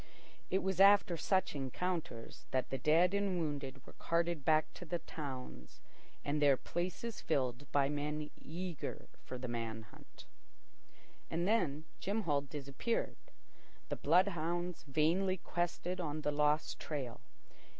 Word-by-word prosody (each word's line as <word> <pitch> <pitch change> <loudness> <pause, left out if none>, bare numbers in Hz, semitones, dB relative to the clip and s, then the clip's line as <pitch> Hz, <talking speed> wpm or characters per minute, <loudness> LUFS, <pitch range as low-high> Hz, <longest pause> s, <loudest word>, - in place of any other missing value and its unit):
It 190 - +2
was 190 -1 0
after 200 -2 +7
such 190 +3 +1
encounters 140 -2 -3
that 130 -1 0
the 135 - -1
dead 165 +7 +4
and 200 -2 +1
wounded 140 -4 -3
were - - -13
carted 170 -2 0
back 155 +1 +3
to - - -8
the 175 +1 -2
towns, 130 - -7 0.5
and 150 +1 0
their 140 -2 +6
places 185 - -3
filled 130 -3 -1
by 140 -1 +4
men 150 +1 -2
eager 175 0 -5
for 130 - -6
the 125 +1 -4
man 115 -2 -3
hunt. 105 - -16 1.0
And 170 +2 0
then 160 -9 +2
Jim 210 +3 -1
Hall 145 -5 +2
disappeared. 140 - -2 0.7
The - - 0
bloodhounds 175 0 +2
vainly 170 +7 +2
quested 175 +1 -2
on 155 -2 -2
the 150 - +1
lost 150 +1 +2
trail. 135 -6 -4
155 Hz, 135 wpm, -36 LUFS, 140-180 Hz, 1.0 s, after